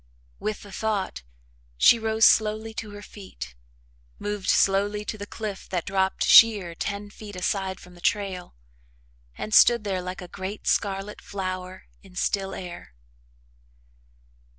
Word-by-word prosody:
With 215 Hz, -, -3 dB
the 205 Hz, -, -12 dB
thought, 200 Hz, -, -2 dB, 0.6 s
she 230 Hz, -, +6 dB
rose 220 Hz, 0 st, +3 dB
slowly 220 Hz, +1 st, +3 dB
to 220 Hz, -1 st, -6 dB
her 205 Hz, 0 st, -10 dB
feet, 65 Hz, -, -9 dB, 0.6 s
moved 205 Hz, -2 st, -3 dB
slowly 205 Hz, +2 st, +2 dB
to 215 Hz, -, -3 dB
the 205 Hz, -1 st, -7 dB
cliff 210 Hz, -4 st, -6 dB
that 180 Hz, -3 st, -2 dB
dropped 190 Hz, -1 st, 0 dB
sheer 205 Hz, -7 st, +7 dB
ten 200 Hz, +4 st, -4 dB
feet 205 Hz, -1 st, -10 dB
aside 190 Hz, +1 st, -2 dB
from 180 Hz, -, -15 dB
the 175 Hz, -, -16 dB
trail, 190 Hz, -, -1 dB, 0.8 s
and 215 Hz, -, -5 dB
stood 235 Hz, 0 st, +7 dB
there 190 Hz, -3 st, -2 dB
like 185 Hz, +1 st, -6 dB
a -, -, -9 dB
great 190 Hz, +3 st, -6 dB
scarlet 195 Hz, +1 st, -1 dB
flower 185 Hz, -1 st, -5 dB, 0.2 s
in 190 Hz, -2 st, -17 dB
still 195 Hz, +1 st, -1 dB
air. 175 Hz, -, -9 dB
200 Hz, 140 wpm, -25 LUFS, 185-210 Hz, 0.8 s, sheer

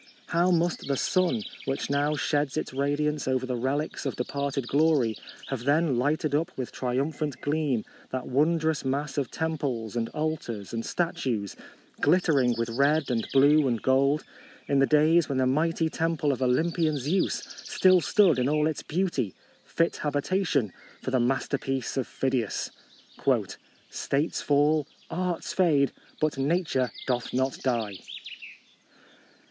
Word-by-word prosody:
How 175 Hz, +1 st, +3 dB
must 175 Hz, -3 st, +1 dB
the 140 Hz, -1 st, 0 dB
sun, 185 Hz, -, +1 dB, 0.2 s
which 135 Hz, +1 st, -2 dB
now 145 Hz, +2 st, +1 dB
sheds 145 Hz, 0 st, 0 dB
its 155 Hz, -, -3 dB
radiance 145 Hz, +2 st, 0 dB
over 130 Hz, -1 st, +1 dB
the 130 Hz, -1 st, -2 dB
relics 135 Hz, +5 st, -2 dB
of 135 Hz, -, -2 dB
departed 135 Hz, 0 st, -2 dB
glory, 140 Hz, -6 st, +3 dB, 0.3 s
have 130 Hz, -4 st, -3 dB
then 145 Hz, -3 st, +2 dB
lighted 150 Hz, +3 st, 0 dB
up 155 Hz, +3 st, +1 dB
with 130 Hz, -2 st, -4 dB
triumphant 135 Hz, +2 st, -2 dB
gleam 145 Hz, -6 st, 0 dB, 0.2 s
that 130 Hz, -1 st, -4 dB
wondrous 155 Hz, +3 st, +1 dB
mass 140 Hz, +1 st, -1 dB
of 135 Hz, -, -2 dB
tem 160 Hz, -1 st, -2 dB
ples 120 Hz, -6 st, -3 dB
and 115 Hz, -1 st, -1 dB
altars 150 Hz, -10 st, -4 dB
and 115 Hz, 0 st, -2 dB
statues, 130 Hz, -, -2 dB, 0.5 s
glitter 175 Hz, -5 st, +3 dB
ing 125 Hz, -2 st, +2 dB
with 115 Hz, 0 st, -1 dB
red 140 Hz, +4 st, +2 dB
and 115 Hz, -2 st, -1 dB
blue 145 Hz, +2 st, +5 dB
and 120 Hz, -3 st, -1 dB
gold, 140 Hz, +3 st, +3 dB, 0.4 s
in 140 Hz, -, +2 dB
the 135 Hz, -, +4 dB
days 155 Hz, +2 st, +4 dB
when 135 Hz, -, -1 dB
the 130 Hz, -, +3 dB
mighty 160 Hz, +5 st, +1 dB
temple 160 Hz, -2 st, 0 dB
of 135 Hz, -, -3 dB
Olympian 155 Hz, +4 st, +1 dB
Zeus 155 Hz, +8 st, 0 dB, 0.2 s
still 185 Hz, -1 st, +4 dB
stood 185 Hz, -6 st, +4 dB
in 125 Hz, +2 st, +1 dB
all 150 Hz, 0 st, +2 dB
its 155 Hz, -1 st, -1 dB
beauty, 155 Hz, -, -1 dB, 0.3 s
fit 165 Hz, 0 st, 0 dB
habitation 145 Hz, -, 0 dB, 0.3 s
for -, -, -3 dB
the 130 Hz, -, +2 dB
masterpiece 135 Hz, +1 st, -1 dB
of 130 Hz, -, -1 dB
Phidias! 130 Hz, -5 st, -1 dB, 0.4 s
' -, -, 0 dB
' -, -, -30 dB, 0.2 s
States 145 Hz, +4 st, -1 dB
fall, 145 Hz, +1 st, +2 dB, 0.2 s
arts 180 Hz, -1 st, -2 dB
fade, 150 Hz, -7 st, +3 dB, 0.3 s
but 155 Hz, -3 st, 0 dB
Nature 140 Hz, -4 st, +1 dB, 0.2 s
doth 125 Hz, -2 st, -1 dB
not 130 Hz, +1 st, 0 dB
die." 115 Hz, -7 st, -1 dB
140 Hz, 150 wpm, -27 LUFS, 130-155 Hz, 0.5 s, blue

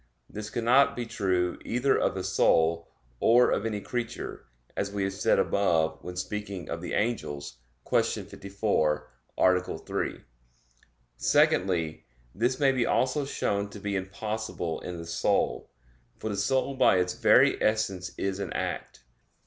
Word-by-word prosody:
This 105 Hz, 0 st, -7 dB
cannot 120 Hz, +5 st, +3 dB
be 120 Hz, -, -3 dB
true 90 Hz, -5 st, 0 dB
either 125 Hz, +3 st, +1 dB
of -, -, +1 dB
the -, -, -3 dB
soul, 85 Hz, +1 st, +2 dB, 0.3 s
or 120 Hz, +2 st, +5 dB
of 110 Hz, -, 0 dB
any 105 Hz, -2 st, -2 dB
creature; 120 Hz, +3 st, -5 dB, 0.3 s
as 100 Hz, -, -1 dB
we 100 Hz, -1 st, -2 dB
have 95 Hz, 0 st, -1 dB
said 95 Hz, -, +2 dB
above 80 Hz, -5 st, +1 dB
when 90 Hz, 0 st, -7 dB
speaking 100 Hz, 0 st, -5 dB
of 80 Hz, 0 st, -4 dB
the 90 Hz, -, -5 dB
angels 75 Hz, -, -2 dB, 0.3 s
(Q. -, -, +4 dB, 0.2 s
54, 95 Hz, -7 st, -1 dB, 0.3 s
A. 90 Hz, 0 st, +2 dB
3). -, -, -4 dB, 0.9 s
Secondly, 85 Hz, -1 st, +2 dB, 0.3 s
this 125 Hz, +5 st, 0 dB
may 140 Hz, -2 st, +4 dB
be 130 Hz, -2 st, +1 dB
also 135 Hz, +3 st, +1 dB
shown 100 Hz, -6 st, -1 dB
to 105 Hz, -, -10 dB
be 100 Hz, 0 st, -3 dB
impossible 95 Hz, -3 st, -3 dB
in 90 Hz, -1 st, -6 dB
the 85 Hz, -, -7 dB
soul. 85 Hz, +1 st, 0 dB, 0.5 s
For 110 Hz, -, -4 dB
the -, -, -2 dB
soul 130 Hz, +7 st, +1 dB
by 130 Hz, -7 st, +4 dB
its 90 Hz, 0 st, +1 dB
very -, -, +4 dB
essence 100 Hz, -4 st, 0 dB
is 95 Hz, 0 st, -2 dB
an 100 Hz, -4 st, -4 dB
act. -, -, -4 dB
100 Hz, 150 wpm, -28 LUFS, 90-110 Hz, 0.9 s, or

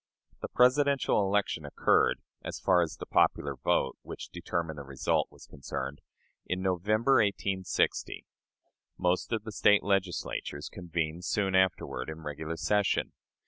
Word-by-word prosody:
The -, -, -3 dB
Presidential 135 Hz, -1 st, +3 dB
election 100 Hz, +1 st, 0 dB
occurred -, -, +2 dB, 0.2 s
(as -, -, -5 dB
far 90 Hz, -2 st, +4 dB
as 80 Hz, -3 st, -2 dB
the -, -, -7 dB
popular 70 Hz, -1 st, +2 dB
vote, 65 Hz, +1 st, 0 dB
which -, -, -8 dB
determined 80 Hz, -3 st, -3 dB
the -, -, -6 dB
result, 70 Hz, -1 st, 0 dB
was -, -, -15 dB
concerned) 70 Hz, -1 st, -6 dB, 0.5 s
in 90 Hz, -, -1 dB
November, 110 Hz, +8 st, +2 dB
1860. 100 Hz, -3 st, 0 dB, 0.7 s
Most 90 Hz, 0 st, 0 dB
of 110 Hz, -2 st, -1 dB
the 110 Hz, -, -6 dB
State 105 Hz, 0 st, +4 dB
Legislatures 95 Hz, -6 st, -2 dB
convened 85 Hz, -1 st, -3 dB
soon 95 Hz, 0 st, 0 dB
afterward 95 Hz, -7 st, +1 dB
in 80 Hz, +1 st, -7 dB
regular 80 Hz, +2 st, -5 dB
session. 105 Hz, +2 st, +1 dB
90 Hz, 135 wpm, -30 LUFS, 80-105 Hz, 0.7 s, far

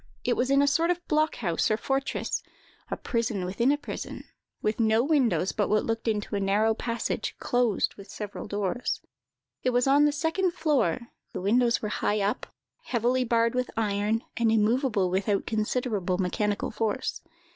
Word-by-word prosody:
It -, -, +1 dB
was 255 Hz, -, 0 dB
in 275 Hz, +1 st, +5 dB
a -, -, +3 dB
sort 330 Hz, +4 st, +2 dB
of 355 Hz, 0 st, -1 dB
block 310 Hz, +1 st, +2 dB
house 175 Hz, -7 st, 0 dB
or 215 Hz, -, +2 dB
fortress—a 270 Hz, +3 st, -4 dB
prison 225 Hz, -5 st, -1 dB
within 235 Hz, +8 st, +2 dB
a 290 Hz, -, +2 dB
prison—with 215 Hz, -6 st, -6 dB
no 220 Hz, 0 st, +3 dB
windows 245 Hz, -, +2 dB
but 205 Hz, -, 0 dB
what 215 Hz, 0 st, +2 dB
looked 225 Hz, +1 st, -2 dB
into 210 Hz, -1 st, -1 dB
a -, -, 0 dB
narrow 205 Hz, +3 st, +2 dB
passage, 230 Hz, +1 st, -3 dB
closed 245 Hz, -5 st, +1 dB
with 200 Hz, 0 st, -12 dB
several 210 Hz, -2 st, -6 dB
doors. 205 Hz, +4 st, -2 dB, 0.6 s
It -, -, +1 dB
was 245 Hz, 0 st, +2 dB
on 280 Hz, +2 st, +5 dB
the 295 Hz, -, +4 dB
second 335 Hz, +5 st, 0 dB
floor; 285 Hz, -6 st, +1 dB, 0.2 s
the -, -, -4 dB
windows 235 Hz, +5 st, +2 dB
were 210 Hz, -, -1 dB
high 210 Hz, 0 st, 0 dB
up, 200 Hz, +1 st, -1 dB, 0.4 s
heavily 245 Hz, +2 st, +1 dB
barred 230 Hz, -1 st, +2 dB
with 250 Hz, 0 st, -1 dB
iron, 210 Hz, +1 st, 0 dB
and 230 Hz, -2 st, +2 dB
immovable 220 Hz, -3 st, +2 dB
without 195 Hz, +2 st, 0 dB
considerable 215 Hz, -4 st, -1 dB
mechanical 200 Hz, +2 st, -1 dB
force. 220 Hz, -2 st, -2 dB
230 Hz, 165 wpm, -27 LUFS, 205-255 Hz, 0.6 s, in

